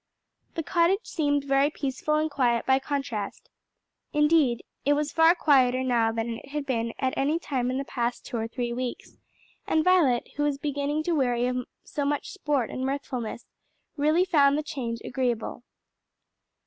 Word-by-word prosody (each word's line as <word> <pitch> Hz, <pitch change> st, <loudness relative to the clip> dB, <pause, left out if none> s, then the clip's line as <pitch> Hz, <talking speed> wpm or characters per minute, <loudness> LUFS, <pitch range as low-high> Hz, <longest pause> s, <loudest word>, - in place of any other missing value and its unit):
The 330 Hz, -, -2 dB
cottage 355 Hz, +6 st, +2 dB
seemed 290 Hz, -3 st, 0 dB
very 275 Hz, +1 st, +3 dB
peaceful 295 Hz, +1 st, -2 dB
and 310 Hz, +1 st, +2 dB
quiet 250 Hz, -5 st, +1 dB
by 265 Hz, 0 st, +4 dB
contrast. 270 Hz, -7 st, -4 dB, 0.6 s
Indeed 300 Hz, -5 st, +3 dB, 0.2 s
it 290 Hz, -, +3 dB
was 295 Hz, 0 st, -1 dB
far 325 Hz, +2 st, +5 dB
quieter 260 Hz, -6 st, +3 dB
now 235 Hz, -3 st, +2 dB
than 230 Hz, 0 st, -3 dB
it -, -, -15 dB
had 295 Hz, 0 st, -3 dB
been 230 Hz, -3 st, -2 dB
at 260 Hz, -1 st, -1 dB
any 290 Hz, +4 st, +1 dB
time 260 Hz, -7 st, -2 dB
in 255 Hz, -, -1 dB
the 275 Hz, -, -3 dB
past 240 Hz, -2 st, -3 dB
two 240 Hz, -, -4 dB
or 225 Hz, 0 st, -2 dB
three 240 Hz, 0 st, -3 dB
weeks, 250 Hz, 0 st, -5 dB, 0.5 s
and 315 Hz, -, +2 dB
Violet, 320 Hz, -10 st, +3 dB
who -, -, -1 dB
was 290 Hz, -1 st, +1 dB
beginning 285 Hz, +1 st, -2 dB
to 345 Hz, -, -1 dB
weary 245 Hz, -6 st, +1 dB
of 250 Hz, 0 st, -2 dB, 0.2 s
so 290 Hz, -, -3 dB
much 290 Hz, +7 st, -1 dB
sport 295 Hz, -, -1 dB
and 260 Hz, -, -4 dB
mirthfulness, 260 Hz, -4 st, -3 dB, 0.5 s
really 310 Hz, +5 st, +3 dB
found 285 Hz, -5 st, +4 dB
the 305 Hz, -, -1 dB
change 235 Hz, -6 st, -4 dB
agreeable. 245 Hz, -3 st, -2 dB
275 Hz, 170 wpm, -27 LUFS, 245-300 Hz, 0.6 s, far